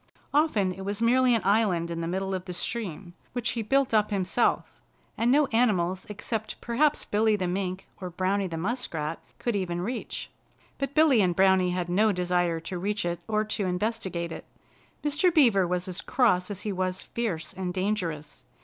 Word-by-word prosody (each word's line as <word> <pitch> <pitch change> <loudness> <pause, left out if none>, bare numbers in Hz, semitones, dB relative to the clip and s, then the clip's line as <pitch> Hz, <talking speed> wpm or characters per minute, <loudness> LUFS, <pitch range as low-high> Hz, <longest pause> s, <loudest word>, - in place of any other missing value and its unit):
Often 280 - +3
it 190 - -9
was 200 +2 -3
merely 245 +1 +4
an 225 - -1
island 195 -5 +2
in 165 0 -3
the 165 - -2
middle 190 +2 -2
of 185 -1 -3
the 180 - -5
stream, 185 -3 -4 0.2
which 245 -2 -1
he 235 - -2
built 270 +3 +1
up 210 -1 +3
himself, 200 +3 0 0.3
and 235 +2 +2
no 295 +2 +5
animals 190 -6 +1
except 215 +1 -4
perhaps 280 +5 +1
Billy 215 +1 +2
the 190 -3 -2
Mink 185 +1 -3
or 185 -2 -5
Browny 190 +2 0
the 165 -2 -5
Muskrat 165 -6 -3 0.2
could 240 -3 -1
even 175 -3 -1
reach. 235 +7 -4 0.5
But 275 0 -3
Billy 305 -7 +5
and 180 -3 +2
Browny 190 -1 +4
had 180 -1 -1
no 210 +5 +3
desire 175 -2 0
to 175 +2 -5
reach 205 +1 -1
it 175 -1 -2
or 215 -1 +1
to 210 -2 -2
investigate 180 -3 -2
it. 160 - -7 0.6
Mr. 300 +5 +2
Beaver 230 - +4
was 180 +1 -2
as 185 0 -5
cross 200 -8 +2
as 205 -1 -6
he 210 - -3
was 185 0 -2
fierce 195 -9 -3
and 185 -1 -3
dangerous. 175 -8 -3
195 Hz, 185 wpm, -27 LUFS, 180-225 Hz, 0.6 s, no